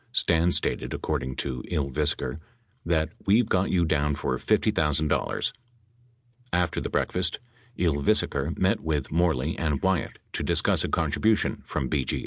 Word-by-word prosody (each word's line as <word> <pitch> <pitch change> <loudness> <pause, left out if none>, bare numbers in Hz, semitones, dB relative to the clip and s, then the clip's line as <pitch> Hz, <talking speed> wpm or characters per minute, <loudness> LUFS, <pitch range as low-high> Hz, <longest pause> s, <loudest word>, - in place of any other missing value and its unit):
Stans 85 +1 +3
stated, - - -2
according 65 0 -3
to 65 -2 -3
Ylvisaker, 70 -2 -1 0.4
that, 80 -2 0 0.2
"we've 110 +3 +4
got 95 -3 +1
you 85 -2 +2
down 75 -2 +1
for 65 - -1
$50,000." 75 -1 +1 1.0
After 90 -1 0
the - - -3
break - - 0
fast 90 -3 +2 0.4
Ylvisaker 70 -2 +1
met 95 +4 +2
with 75 -4 -2
Moreley 80 -3 +1
and 75 -4 0
Wyatt 95 -3 0 0.2
to - - -2
discuss - - +1
a - - -2
contribution 110 -1 +1
from 65 - -2
BGA. 70 -2 -1
80 Hz, 135 wpm, -26 LUFS, 70-90 Hz, 1.0 s, we've